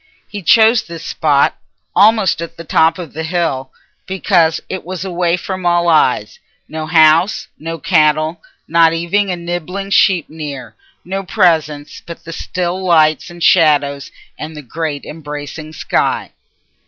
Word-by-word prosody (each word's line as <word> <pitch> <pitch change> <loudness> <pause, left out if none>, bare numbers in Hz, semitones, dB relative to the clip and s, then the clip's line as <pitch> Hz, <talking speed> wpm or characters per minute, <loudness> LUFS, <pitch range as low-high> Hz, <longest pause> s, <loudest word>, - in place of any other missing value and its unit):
He 205 -1 -7
chose 220 +5 +5
this 165 -1 -10
spot, 145 -4 +1 0.4
almost 210 -5 +4
at 170 0 -7
the 165 - -8
top 160 0 +2
of 175 -5 -8
the 160 - -5
hill, 160 -6 -2 0.4
because 180 -4 +1
it 190 - -5
was 185 0 -6
away 175 -1 0
from 185 +1 -6
all 175 0 +2
eyes—no 160 - -1
house, 165 +3 +3
no 165 +1 -5
cattle, 155 0 +1 0.3
not 165 0 +4
even 170 +5 0
a 180 - -1
nibbling 175 +3 -5
sheep 185 -5 +3
near—no 170 - -8
presence 155 -5 0
but 170 - -10
the 165 - -8
still 180 +2 -3
lights 155 -3 +2
and 175 -1 -8
shadows 145 -4 +3 0.3
and 155 0 -7
the 150 - -8
great 150 +2 -4
embracing 150 0 -8
sky. 155 - -1
165 Hz, 140 wpm, -16 LUFS, 155-180 Hz, 0.4 s, chose